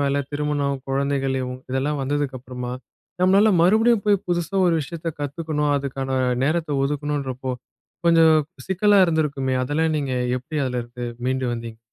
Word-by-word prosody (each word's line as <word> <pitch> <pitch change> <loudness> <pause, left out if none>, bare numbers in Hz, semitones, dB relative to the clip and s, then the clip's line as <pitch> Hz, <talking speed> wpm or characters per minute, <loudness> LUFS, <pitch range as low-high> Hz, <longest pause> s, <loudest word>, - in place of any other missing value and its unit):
மேல 140 0 +1 0.2
திருமணம், 145 -1 -1
குழந்தைகள் 135 0 0
இவுங் 125 0 -5
இதெல்லாம் 140 +3 -1
வந்ததுக்கு 140 -1 -1
அப்புறமா, 125 0 -6 0.5
நம்மளால 195 +4 +5
மறுபடியும் 220 +4 +4
போய்ப் 205 -2 +2
புதுசா 175 +1 -1
ஒரு 170 - +3
விஷயத்தைக் 165 +1 -6
கத்துக்கணும். 150 0 -1
அதுக்கான 135 -1 -2 0.3
நேரத்த 155 -2 0
ஒதுக்கணும்ன்றப்போ, 140 -2 -2 0.5
கொஞ்சம் 165 -1 +6 0.3
சிக்கலா 200 +2 +3
இருந்திருக்குமே! 145 -5 0
அதெல்லாம் 155 +4 0
நீங்க 140 -3 -2 0.3
எப்படி 150 +5 -5
அதுல 125 -1 -2
இருந்து 120 +1 -8 0.2
மீண்டு 130 0 0
வந்தீங்க? 115 -1 -6
145 Hz, 135 wpm, -23 LUFS, 130-160 Hz, 0.5 s, கொஞ்சம்